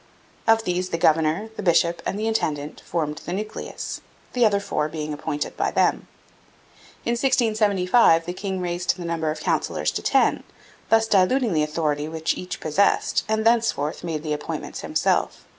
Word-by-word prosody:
Of 225 0 +5
these 180 -1 -1
the 165 - -1
governor, 160 +5 +2
the - - -3
bishop, 170 -2 +2
and - - -2
the 215 - -2
intendant 155 -10 -2
formed 155 -2 -2
the 175 - -6
nucleus, 215 +3 -5 0.3
the 245 - +2
other 200 -1 +1
four 150 -6 -2
being 155 -1 -4
appointed 145 0 -4
by - - 0
them. - - +1 1.0
In 235 - +1
1675 215 -7 +3
the 175 - -4
king 190 0 -4
raised 175 +1 -1
the 175 - -6
number 165 -2 -1
of 155 - -4
councillors - - 0
to - - -3
ten, - - +2 0.5
thus 225 0 +4
diluting 220 +3 +3
the 155 - +2
authority 150 -1 -1
which 160 0 -1
each 180 - -6
possessed, 160 +6 +2
and 220 0 0
thenceforth 225 -12 +1
made 160 -3 -3
the 155 -1 -1
appointments 150 - -5
himself. - - 0
180 Hz, 165 wpm, -23 LUFS, 155-215 Hz, 1.0 s, Of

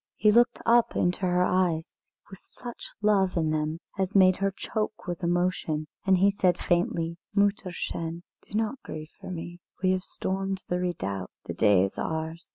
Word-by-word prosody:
He 210 - +4
looked 240 +3 +4
up 235 0 +4
into 180 0 +1
her 180 0 +3
eyes, 180 -3 +1 0.3
with 195 - -11
such 240 -1 -8
love 195 -4 +3
in 160 -2 +1
them 155 +1 -1 0.2
as 190 +2 -1
made 185 -1 +6
her 195 0 +1
choke 215 +2 -4
with 175 0 -4
emotion, 175 -3 0 0.2
and 190 -1 +6
he 195 +2 +5
said 185 -3 +2
faintly: 170 -2 0 0.2
"Mütterchen, 180 -4 -1 0.2
do - - -11
not 225 +4 -1
grieve 155 +1 -8
for - - -8
me; 175 0 -6 0.2
we 185 - +4
have 185 -1 0
stormed 195 0 -3
the 180 - 0
redoubt, 100 - -3 0.2
the 85 - -4
day 100 +1 +4
is 95 - -3
ours. 160 +1 -4
180 Hz, 170 wpm, -27 LUFS, 165-195 Hz, 0.3 s, made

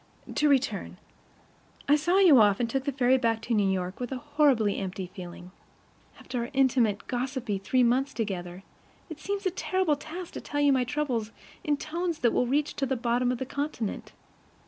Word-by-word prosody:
To 300 - +2
return: 275 -1 0 0.9
I 290 - +6
saw 345 +5 +2
you 350 -10 +7
off, 205 -2 +4
and 240 - +1
took 265 +3 -2
the 285 - 0
ferry 260 -1 +3
back 230 -2 +1
to 235 - -2
New 205 -3 +2
York 185 -1 -2
with 245 0 -4
a 265 - -2
horribly 280 -7 +2
empty 185 -1 -5
feeling. 180 -1 -9 0.7
After 250 - -5
our 235 - -3
intimate, 250 -6 +2
gossipy 250 -4 -3
three 250 +6 +2
months 255 +4 +2
together, 185 -4 -4 0.5
it 310 - -7
seems 400 +3 -4
a 375 - +2
terrible 370 -3 0
task 330 +5 -8
to - - -6
tell 290 - -4
you 285 -1 +4
my 255 -1 +2
troubles 250 -6 -2 0.3
in 300 -4 +1
tones 335 +2 -3
that 235 - +3
will 250 - +1
reach 290 +4 0
to 275 - 0
the 265 0 -1
bottom 245 +1 +1
of 250 - -2
the 260 - -4
continent. 280 -6 -4
255 Hz, 190 wpm, -27 LUFS, 225-290 Hz, 0.9 s, you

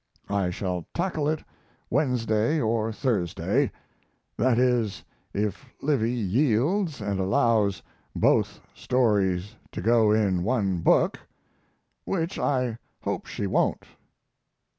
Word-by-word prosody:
I 100 -3 +1
shall 90 -1 -3
tackle 170 -5 0
it 155 0 -2 0.5
Wednesday 120 0 +1
or 115 -2 0
Thursday; 110 - 0 0.6
that 120 0 +2
is, 120 -5 +1 0.3
if 105 +1 -2 0.2
Livy 135 -6 +1
yields 125 - +1
and 100 -2 -2
allows 100 +1 +2 0.3
both - - +2
stories 105 -5 +1 0.2
to - - -4
go 110 +2 +4
in 100 -4 +2
one 100 -4 0
book, - - +3 0.8
which 170 -1 -2
I 125 -4 0 0.2
hope - - -3
she 100 - -4
won't. 95 - 0
115 Hz, 105 wpm, -26 LUFS, 100-130 Hz, 0.8 s, go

